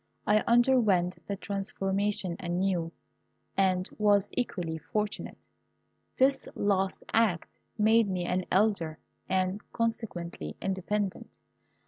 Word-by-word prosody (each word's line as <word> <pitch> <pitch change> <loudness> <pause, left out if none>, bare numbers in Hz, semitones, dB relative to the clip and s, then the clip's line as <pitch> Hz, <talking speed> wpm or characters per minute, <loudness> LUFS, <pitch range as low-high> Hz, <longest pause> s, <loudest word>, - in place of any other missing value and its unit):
I 210 0 +4
underwent 230 -7 +3
the 200 - -2
transformation 195 -1 -2
anew, 175 -1 -1 0.6
and 185 -1 +2
was 205 -1 +3
equally 175 -9 -2
fortunate. 210 +4 -3 0.8
This 270 +1 +3
last 195 -2 0
act 215 -7 +2 0.3
made 220 0 +4
me 180 -2 -1
an 180 +1 0
Elder, 190 -6 +2 0.3
and, 185 +2 0
consequently, 175 - -3
independent. 195 +1 -2
195 Hz, 95 wpm, -29 LUFS, 180-210 Hz, 0.8 s, I